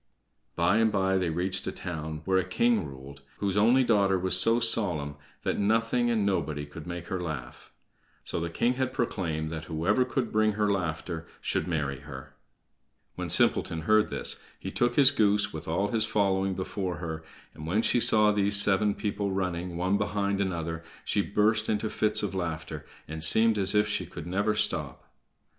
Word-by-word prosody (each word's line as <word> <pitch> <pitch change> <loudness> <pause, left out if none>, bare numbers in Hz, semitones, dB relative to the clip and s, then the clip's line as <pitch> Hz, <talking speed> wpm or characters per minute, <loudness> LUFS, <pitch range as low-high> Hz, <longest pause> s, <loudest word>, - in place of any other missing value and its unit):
By 90 +5 +2
and 110 -1 +3
by 95 -1 +1
they 90 -2 -1
reached 95 +3 -2
a - - -1
town 80 -3 -6
where 95 -1 +2
a - - 0
king 105 -1 +1
ruled 70 0 -12 0.2
whose 100 -2 -2
only 120 +6 +4
daughter 100 -5 +2
was 95 0 +1
so 115 +6 +5
solemn 90 -11 +1 0.3
that - - -1
nothing 115 +3 +1
and 110 -3 +1
nobody 75 -7 -1
could 75 +3 -11
make 85 -1 -6
her 95 -3 -3
laugh. 80 -6 -7 0.5
So - - -3
the 85 0 -3
king 120 +9 0
had 130 0 -1
proclaimed 80 -10 -2
that 80 0 -6
whoever 90 +10 +1
could 125 -2 -3
bring 110 0 +2
her 105 0 0
laughter 80 -2 -3
should - - -2
marry 75 -6 -2
her. 65 -2 -11 0.8
When - - -5
Simpleton 80 -1 +1
heard 110 +6 +3
this - - -2 0.2
he - - -7
took 120 0 0
his 140 -1 +7
goose, 105 -4 +1
with 80 +1 -7
all 90 +5 0
his 115 -2 +2
following, 95 -3 0
before 95 -1 -4
her, 80 -2 -6 0.3
and 75 +1 -9
when 105 +7 +1
she 120 - +2
saw 105 -2 +5
these 100 -1 +4
seven 100 +1 +3
people 100 -2 -3
running, 90 -2 -3
one 95 +3 0
behind 100 -1 -1
another, 85 -3 -3 0.2
she 100 - +1
burst 110 +2 +1
into 105 0 -1
fits 105 0 +1
of 100 - -3
laughter, 80 -5 -5 0.2
and 80 +1 -4
seemed 110 +5 +5
as 100 +1 +3
if 105 0 +3
she 105 - -2
could - - -9
never 100 +4 0
stop. 105 0 -1
95 Hz, 185 wpm, -27 LUFS, 85-105 Hz, 0.8 s, his